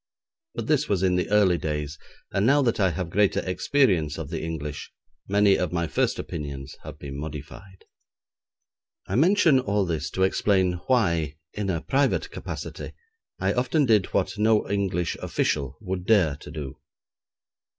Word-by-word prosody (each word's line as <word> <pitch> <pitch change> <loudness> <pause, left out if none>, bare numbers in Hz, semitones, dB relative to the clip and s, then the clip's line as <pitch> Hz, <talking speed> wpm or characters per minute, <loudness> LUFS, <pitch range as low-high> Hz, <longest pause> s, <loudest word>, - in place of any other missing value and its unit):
But - - -3
this 150 -1 +1
was 95 -2 +1
in 90 -1 +3
the 90 - 0
early 100 -5 +4
days, 75 -1 -3 0.3
and 100 0 +1
now 140 +5 +4
that 115 -3 +1
I 95 -2 +4
have 85 0 -4
greater 100 +1 +2
experience 90 - +1
of 80 -3 -6
the 80 - -3
English, 75 -3 -5 0.4
many 100 0 +4
of 90 - -1
my 85 -1 0
first - - 0
opinions 70 -2 -6
have - - -9
been 70 0 -7
modified. 80 +6 -9 1.2
I - - -6
mention 160 - +4
all 105 -5 0
this 80 -3 -2
to 95 - +3
explain 95 -2 +2
why, 85 - +1 0.2
in 105 -2 -3
a 85 -3 -1
private 140 0 +1
capacity, - - -6 0.5
I - - +1
often 130 +4 +1
did 110 -6 +3
what 100 +2 -1
no 110 0 +3
English 95 -4 -1
official 70 -2 -1
would 95 -2 -4
dare 95 -10 +4
to 75 - -12
do. 75 -4 -7
95 Hz, 160 wpm, -25 LUFS, 80-105 Hz, 1.2 s, early